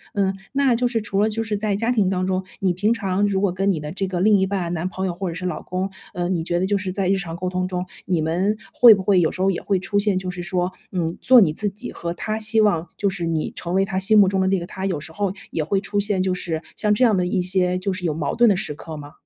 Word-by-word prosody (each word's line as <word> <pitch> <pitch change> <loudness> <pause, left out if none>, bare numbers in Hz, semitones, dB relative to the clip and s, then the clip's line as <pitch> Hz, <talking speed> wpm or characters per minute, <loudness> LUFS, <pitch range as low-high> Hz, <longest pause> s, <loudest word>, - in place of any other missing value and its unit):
嗯， 195 -1 +1 0.2
那 275 -3 +3
就 245 +1 +1
是 240 -2 0
除 200 -1 0
了 215 - +3
就 225 +1 -1
是 215 -1 -2
在 205 0 -1
家 230 +4 0
庭 210 -6 +2
当 185 -1 0
中， 185 0 -1 0.2
你 185 -2 +2
平 205 +5 +1
常 200 -1 0
如 195 -1 0
果 200 -3 +1
跟 195 +2 +1
你 170 - -2
的 150 0 -6
这 195 +2 -2
个 185 -2 -3
另 205 +3 +5
一 190 0 +1
半 185 -3 -2
男 175 +2 -2
朋 190 0 -4
友 180 - -1
或 185 +2 -4
者 165 - -6
是 180 +1 -5
老 175 -4 -3
公， 185 +2 -3 0.2
呃， 175 0 -1
你 175 -3 -1
觉 175 +1 -1
得 185 - +1
就 200 +1 +1
是 185 -1 -3
在 190 0 -1
日 195 - +3
常 175 -4 -5
沟 180 +2 -4
通 185 0 -1
中， 180 -1 -3 0.2
你 175 -2 0
们 160 +2 -1 0.3
会 240 -2 +9
不 195 - -5
会 190 -1 +4
有 165 - +3
时 185 - -6
候 195 +1 +3
也 175 - -4
会 195 - 0
出 205 +2 0
现， 205 -2 +1
就 185 0 -3
是 180 0 -5
说， 180 0 -1 0.2
嗯， 175 -3 0
做 255 -2 +7
你 170 -7 +4
自 205 +5 -1
己 200 +2 -8
和 170 0 -4
他 215 +5 -3
希 220 0 +3
望 175 -6 +2
就 200 - +1
是 185 -3 -4
你 165 -2 -1
成 175 0 -4
为 195 - +3
他 190 -1 -2
心 215 +3 +4
目 200 -2 +7
中 190 0 0
的 190 - +1
那 195 - +2
个 170 - -6
她， 190 +2 -6
有 180 -5 -1
时 155 - -8
候 200 +1 -2 0.2
也 160 - -1
会 195 +5 0
出 205 0 -2
现， 200 -2 0
就 185 - 0
是 170 -3 -3 0.2
像 210 -1 +2
这 210 - +2
样 225 -4 +4
的 180 - +1
一 180 - 0
些 180 0 +1
就 185 +2 -2
是 180 -1 -5
有 160 - 0
矛 150 -1 -2
盾 235 -2 +5
的 200 - +3
时 165 -5 -3
刻 160 +1 -9
吗？ 145 0 -10
190 Hz, 335 characters per minute, -22 LUFS, 180-205 Hz, 0.3 s, 会